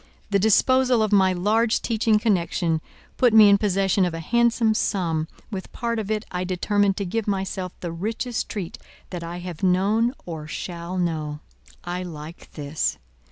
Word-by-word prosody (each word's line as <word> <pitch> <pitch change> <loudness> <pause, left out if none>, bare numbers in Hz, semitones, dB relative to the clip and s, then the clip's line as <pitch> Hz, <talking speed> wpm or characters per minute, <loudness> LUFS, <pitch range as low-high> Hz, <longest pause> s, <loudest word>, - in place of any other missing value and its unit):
"The 200 - +3
disposal 250 +3 +4
of 215 - -1
my 190 -2 +5
large 215 +5 +2
teaching 220 -1 +2
connection 175 -6 0 0.4
put 245 -3 +4
me 215 -2 +9
in 200 0 +5
possession 195 -1 +2
of 175 -2 0
a - - -4
handsome 235 +4 +2
sum 165 -7 0 0.2
with 190 -3 -6
part 235 -1 -2
of 210 -2 -4
it 215 0 -1
I 180 0 -2
determined 195 +2 +1
to 200 - -2
give 215 +4 -2
myself 190 -2 -3
the 175 - -4
richest 225 +7 -3
treat 195 -6 -5 0.3
that 175 -2 -5
I 170 +1 -5
have 175 -2 -7
known 205 +7 +2
or 160 -3 -6
shall 170 +3 -5
know. 155 -4 -2 0.4
I 175 +1 -3
like 165 -2 -9
this. 150 0 -2
190 Hz, 165 wpm, -24 LUFS, 175-220 Hz, 0.4 s, me